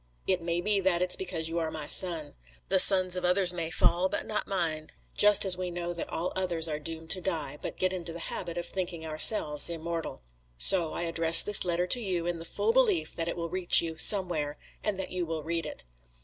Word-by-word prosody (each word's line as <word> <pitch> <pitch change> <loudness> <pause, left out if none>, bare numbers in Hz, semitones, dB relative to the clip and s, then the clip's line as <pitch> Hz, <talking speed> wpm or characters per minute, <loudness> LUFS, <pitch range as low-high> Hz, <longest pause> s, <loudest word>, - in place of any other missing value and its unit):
It 185 -2 -1
may 170 +1 -3
be 205 +2 +1
that 180 -2 0
it's 180 - +2
because 170 -4 -5
you 165 +1 -3
are 160 -1 -3
my 155 -2 -7
son. 165 -3 -1 0.4
The 190 - +2
sons 185 -1 +5
of 180 - -5
others 180 0 +3
may 165 -2 -4
fall, 180 +2 0
but - - -4
not 210 -1 -3
mine, 160 -5 -3 0.3
just 210 -1 +4
as 185 -1 +3
we 180 -1 -4
know 175 0 -6
that 170 - -7
all 170 +3 -5
others 175 -3 -2
are 150 -1 -4
doomed 160 +1 -9
to 185 - 0
die, 155 -6 -5
but - - -8
get 185 0 -1
into 175 -2 -7
the 165 - -9
habit 170 0 -7
of 175 - -5
thinking 175 -3 -5
ourselves 155 -1 +4
immortal. 165 - -7 0.3
So, 170 - +4
I - - -5
address 165 0 +4
this 210 - +3
letter 175 0 -1
to 215 +7 0
you 185 -6 -3
in 175 -1 -4
the 165 - -10
full 450 - -2
belief 465 -8 +1
that 165 -1 -4
it 170 - -5
will 170 -1 -5
reach 185 -2 +6
you 165 -1 -6
somewhere, 165 -7 +3 0.3
and 205 -3 -3
that 190 - -6
you 180 -1 -3
will 160 -2 -6
read 165 0 -4
it. - - -9
175 Hz, 230 wpm, -27 LUFS, 165-185 Hz, 0.4 s, reach